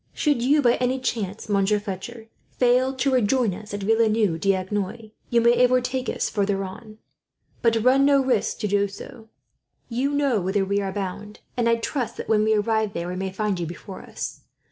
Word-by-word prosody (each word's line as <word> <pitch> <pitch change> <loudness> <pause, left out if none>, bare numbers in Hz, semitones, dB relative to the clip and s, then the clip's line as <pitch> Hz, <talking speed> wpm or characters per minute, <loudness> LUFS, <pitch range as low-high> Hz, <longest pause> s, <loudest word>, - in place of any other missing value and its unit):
"Should 290 -6 +1
you 285 +4 +3
by 240 -1 +4
any 255 +1 0
chance, 220 -5 -3
Monsieur 205 0 +2
Fletcher, 205 +3 -7 0.3
fail 255 +2 +3
to 265 +1 0
rejoin 245 -3 +2
us 210 +3 -9
at 205 -1 -4
Villeneuve 215 -4 +2
d'Agenois, 195 +4 -2 0.2
you 235 -1 +3
may 235 +1 +4
overtake 255 +1 +1
us - - -1
farther 200 -1 -1
on. 215 +3 -9 0.6
But 230 -2 +2
run 260 +2 +5
no 280 0 +5
risk 255 -5 0
to 210 - 0
do 200 0 +2
so. 220 +3 -11 0.6
You 255 +4 0
know 275 -7 +1
whither 190 +2 0
we 200 +1 0
are 195 -1 -3
bound, 205 +2 -6
and 235 -2 +1
I 230 - +4
trust 240 +2 -3
that, - - -6
when 215 -1 +3
we 220 0 +3
arrive 215 0 0
there, 170 +1 -4
we 180 - -4
may 190 +1 -3
find 205 -1 -2
you 170 - -3
before 180 +3 -9
us. - - -7
220 Hz, 190 wpm, -24 LUFS, 200-245 Hz, 0.6 s, run